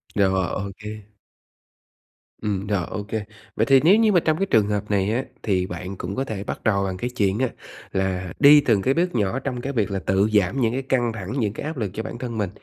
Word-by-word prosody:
Rồi, 95 -3 +2
ô 100 +1 -3
kê. 105 0 -9 1.3
Ừm, 100 -1 -2
rồi, 95 -5 0
ô 105 - -5
kê. 110 0 -4 0.3
Vậy - - +2
thì 135 -2 +6
nếu 185 +6 +7
như 220 -1 +4
mà 175 - +5
trong 155 -1 +1
cái 195 - +1
trường 110 - +3
hợp 105 0 -2
này 100 +1 +1
á, 130 +3 0 0.2
thì 95 -3 +1
bạn 90 +2 -6
cũng 95 +3 -5
có 135 - 0
thể 105 -6 -5
bắt - - -6
đầu 100 -2 +2
bằng 95 -1 -3
cái 125 +4 -3
chuyện 105 -4 0
á 130 - +2 0.4
là 95 -1 -2
đi 145 0 +8
từng 110 -8 +2
cái 130 +6 +2
bước 180 +3 0
nhỏ 110 +2 0
trong 125 -2 -4
cái 140 +2 -4
việc 110 -4 0
là 95 - -1
tự 95 +2 +2
giảm 105 +6 +2
những 115 0 +2
cái 135 - -1
căng 125 -3 0
thẳng, 105 +1 -6
những 105 -4 0
cái 115 - -6
áp 155 0 -4
lực 105 -6 -2
cho 110 - -4
bản 120 - -6
thân 120 -2 -5
mình. 100 -4 -1
105 Hz, 250 wpm, -23 LUFS, 95-130 Hz, 1.3 s, đi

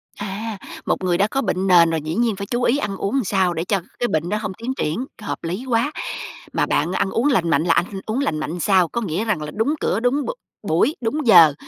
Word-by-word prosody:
À, 205 +2 -5 0.3
một - - -1
người 180 -2 +2
đã 200 - +3
có 270 +5 -1
bệnh 190 -6 -1
nền 175 -3 +6
rồi 165 -1 -1
dĩ 155 +2 -4
nhiên 230 -1 +1
phải 200 +1 -6
chú 240 +3 -1
ý 250 +3 +3
ăn 205 -8 -3
uống 245 +8 0
sao 190 -2 +1
để 165 0 -2
cho 195 +2 0 0.2
cái 245 - +1
bệnh 160 -4 -1
đó 210 - 0
hông 200 -3 -4
tiến 230 +6 -4
triển, 175 +2 -2 0.2
hợp 210 - -5
lý 180 +9 -3
quá. 240 +4 +1 0.6
Mà - - +2
bạn 160 +4 0
ăn 190 - 0
uống 240 +5 +1
lành 185 - +2
mạnh 155 -1 +3
là 170 - +3
anh - - +2 0.2
uống 220 +4 -1
lành 160 - 0
mạnh 160 +3 -4
sao? 185 -1 +3
Có 235 - -3
nghĩa 195 +1 -2
rằng 210 -8 0
là 150 0 -5
đúng 250 +8 +1
cửa, 195 - 0
đúng 250 +5 +1
b - - -4 0.4
buổi, 170 - +2
đúng 255 +4 -1
giờ, 170 -8 +8
200 Hz, 255 wpm, -21 LUFS, 170-235 Hz, 0.6 s, giờ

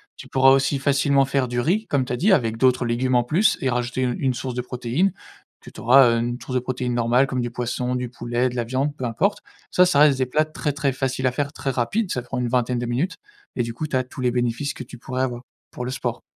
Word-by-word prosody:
Tu - - -12
pourras 135 0 +5
aussi 135 +1 +2
facilement 140 0 +3
faire 135 -2 0
du 120 0 -1
riz, 195 - 0
comme 135 -3 +1
tu 125 - -4
as - - +1
dit, 195 - +3
avec 115 -10 +2
d'autres 125 0 +3
légumes 125 +2 0
en 120 - +4
plus 175 - +2
et 135 - 0
rajouter 125 +1 -1
u 125 -1 0
une 135 -2 +1
source 130 +1 -4
de 125 - -2
protéine 125 +9 -1 0.5
que - - -13
tu - - -12
auras, 125 +1 +6
heu, 115 - +1
une 120 +1 -2
source 130 - -7
de - - +3
protéines 125 0 -3
normale 120 +2 +3
comme 130 -2 -2
du 120 - -2
poisson, 125 +1 -2
du 125 0 -2
poulet, 120 +1 -1
de 125 - -8
la 120 - 0
viande, 130 +5 -1
peu 130 - -7
importe. 155 - 0 0.3
Ça, 180 - +5
ça 165 - +1
reste 145 -3 +5
des 130 - +1
plats 155 +5 +2
très, 150 -1 -3
très 140 -1 0
faciles 130 0 -2
à 125 - +2
faire, 145 +2 -2
très 135 - -3
rapides. 175 - -1
Ça 125 - -1
prend 125 +2 -6
une 125 - -1
vingtaine 125 0 0
de 120 - -3
minutes 130 +10 -1 0.4
et 120 - 0
du 115 0 -5
coup, 155 +6 -4
tu 145 - -3
as 130 - +2
tous 130 +1 -9
les 125 - +2
bénéfices 120 +3 -1
que - - -7
tu 125 - -12
pourrais 130 +1 -3
avoir 120 -2 -3 0.3
pour 125 - -6
le - - -3
sport. 120 -2 -3
130 Hz, 275 wpm, -23 LUFS, 120-140 Hz, 0.5 s, auras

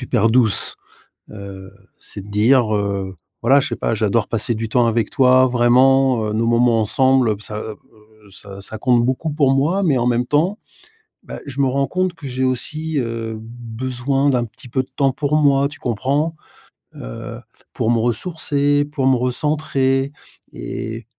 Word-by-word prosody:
super 120 -3 +1
douce, 115 -3 +2 0.6
heu. 100 -2 -10 0.3
C'est 100 - -9
de 105 - -13
dire, 110 +2 +3
heu, 100 -2 -2 0.3
voilà 135 +4 +5
je - - -2
sais - - -3
pas: 115 - -1
«J'adore 110 +1 0
passer 115 +1 -1
du 110 0 -4
temps 120 0 +3
avec 115 -2 0
toi, 130 0 +4
vraiment 125 -2 +3
nos 115 +1 0
moments 120 0 +3
ensemble, 130 +3 +2
heu, 105 - -1
ça, 105 0 -7
heu, 110 -1 -7 0.5
ça 100 +1 -10
ça 110 - -7
compte 120 +1 +2
beaucoup 130 +6 -1
pour 145 -3 +2
moi. 170 +9 +1
Mais, 145 -7 +2
en 120 +1 0
même 120 0 +1
temps, 165 - +1 0.7
bah, - - -8
je 140 0 -5
me 135 - +3
rends 135 +1 0
compte 185 -1 -1
que 165 -4 -10
j'ai 130 0 -2
aussi, 155 +5 -2
heu, 115 -2 -3
besoin 125 +4 -2
d'un 125 -3 +1
petit 120 +2 -13
peu 130 +2 0
de - - -18
temps 135 -2 +2
pour 150 +2 -1
moi, 140 -2 +3
tu 145 0 -12
comprends? 140 +6 -1 0.6
Heu, - - -8 0.3
pour 110 - 0
me 120 - +2
ressourcer, 145 +3 0
pour 145 -2 -3
me 130 - +5
recentrer 135 +1 0 0.4
et 110 - -6
125 Hz, 175 wpm, -19 LUFS, 115-140 Hz, 0.7 s, voilà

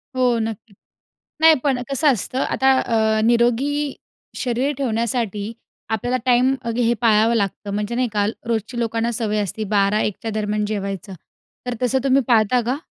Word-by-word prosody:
हो, 250 -2 +2
नक्कीच. 220 -1 -5 0.7
नाही 320 0 +7
पण 270 -3 +2
कसं 295 +3 +2
असतं 245 +3 -3
आता 265 0 +2
अ, 220 -1 +1
निरोगी 245 +5 +1 0.4
शरीर 255 +3 -1
ठेवण्यासाठी 225 -4 -2 0.4
आपल्याला 235 +3 -1
टाईम 250 +1 +4
अ, 235 - -3
हे 240 -1 +2
पाळावं 225 0 +4
लागतं. 200 -1 -2
म्हणजे 210 +3 -2
नाही 250 0 0
का 205 -1 +1 0.2
रोजची 230 +1 -2
लोकांना 230 0 -1
सवय 215 -2 -1
असते 205 +3 -4
12:00-1:00 205 +1 +2
च्या 225 - -3
दरम्यान 210 0 -1
जेवायचं, 200 -2 -4 0.5
तर 245 - -2
तसं 250 +2 +2
तुम्ही 270 0 +3
पाळता 235 +1 +4
का? 255 +3 0
230 Hz, 155 wpm, -21 LUFS, 215-250 Hz, 0.7 s, नाही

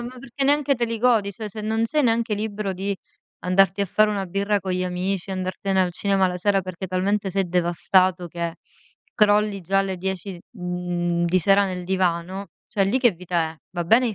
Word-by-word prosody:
ma 245 +2 -7
perché 270 +1 -6
neanche 285 0 +3
te 235 - 0
li 230 0 -3
godi, 220 -4 +3
ceh 215 +2 -6
se 215 +2 -7
non 220 +1 0
sei 300 +6 +1
neanche 230 -1 +1
libero 205 -1 -3
di 195 +1 -3 0.4
andarti 190 +1 +3
a 200 - +3
fare 215 +4 +3
una 200 -2 -1
birra 200 +3 0
con 190 0 -4
gli 185 0 -1
amici, 180 +1 -2
andartene 190 +1 -1
al 180 -1 -1
cinema 195 +1 +2
la 180 - -3
sera 195 +1 +1
perché 185 +1 -6
talmente 195 +2 0
sei 190 0 0
devastato 180 +1 +2
che 170 0 -4 0.6
crolli 210 -1 +3
già 195 +3 +1
alle 195 -1 0
10, 190 0 -4
mhmm, 175 -3 -2
di 180 +2 +3
sera 195 +3 +5
nel 180 -2 -4
divano, 185 +1 -1 0.2
ceh 200 -4 +1
lì 215 +7 +1
che 245 -2 +5
vita 175 -3 -2
è? 160 - -13
Va 175 -1 -3
bene 235 +8 +4
i 220 - -2
195 Hz, 205 wpm, -23 LUFS, 180-210 Hz, 0.6 s, sera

